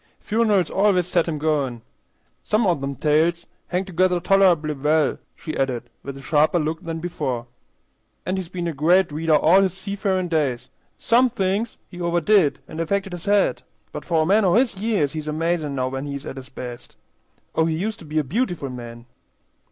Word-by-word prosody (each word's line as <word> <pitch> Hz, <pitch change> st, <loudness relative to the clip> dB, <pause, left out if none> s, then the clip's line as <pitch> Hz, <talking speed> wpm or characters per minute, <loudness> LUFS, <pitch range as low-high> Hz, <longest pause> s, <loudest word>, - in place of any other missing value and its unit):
"Funerals 210 Hz, -4 st, +1 dB
always 195 Hz, -3 st, +3 dB
sets 175 Hz, -1 st, +1 dB
him 155 Hz, -, -2 dB
goin'. 145 Hz, -6 st, -1 dB, 0.6 s
Some 215 Hz, +1 st, +1 dB
o' 180 Hz, -, +4 dB
them 140 Hz, -3 st, -4 dB
tales 160 Hz, +4 st, +1 dB, 0.2 s
hangs 180 Hz, +2 st, -1 dB
together 185 Hz, -1 st, +1 dB
toler'ble 175 Hz, -5 st, +3 dB
well," 150 Hz, 0 st, +2 dB, 0.2 s
she 155 Hz, -, -6 dB
added, 125 Hz, -3 st, -2 dB
with 140 Hz, 0 st, -7 dB
a 135 Hz, -, -11 dB
sharper 155 Hz, +4 st, +3 dB
look 160 Hz, 0 st, -2 dB
than 165 Hz, -1 st, -4 dB
before. 145 Hz, -8 st, -3 dB, 0.8 s
"An' 185 Hz, -, -1 dB
he's 185 Hz, -3 st, -4 dB
been 175 Hz, -1 st, -4 dB
a 165 Hz, -, -2 dB
great 170 Hz, +5 st, +3 dB
reader 155 Hz, +1 st, +2 dB
all 175 Hz, +6 st, +5 dB
his 190 Hz, -2 st, 0 dB
seafarin' 195 Hz, -1 st, -2 dB
days. 145 Hz, -7 st, -1 dB, 0.3 s
Some 250 Hz, +2 st, +3 dB
thinks 205 Hz, 0 st, -1 dB
he 175 Hz, -, -10 dB
overdid, 170 Hz, -1 st, +3 dB
and 160 Hz, -, -8 dB
affected 195 Hz, +3 st, -1 dB
his 175 Hz, -1 st, -7 dB
head, 205 Hz, 0 st, +2 dB, 0.3 s
but -, -, -6 dB
for 165 Hz, -2 st, +1 dB
a -, -, -1 dB
man 205 Hz, +5 st, +4 dB
o' 185 Hz, -1 st, +3 dB
his 245 Hz, -1 st, +3 dB
years 200 Hz, -9 st, 0 dB
he's 155 Hz, -1 st, -5 dB
amazin' 155 Hz, -1 st, -1 dB
now 130 Hz, -1 st, -1 dB
when 135 Hz, +2 st, -4 dB
he's 140 Hz, -1 st, -6 dB
at -, -, -7 dB
his 130 Hz, 0 st, -9 dB
best. 125 Hz, -2 st, -9 dB, 0.6 s
Oh, 160 Hz, -, +2 dB
he 160 Hz, -1 st, 0 dB
used 210 Hz, +5 st, -3 dB
to 165 Hz, -, -12 dB
be 155 Hz, +1 st, -4 dB
a 155 Hz, -, +3 dB
beautiful 175 Hz, -, -2 dB
man!" 120 Hz, -1 st, -9 dB
165 Hz, 190 wpm, -22 LUFS, 150-190 Hz, 0.8 s, all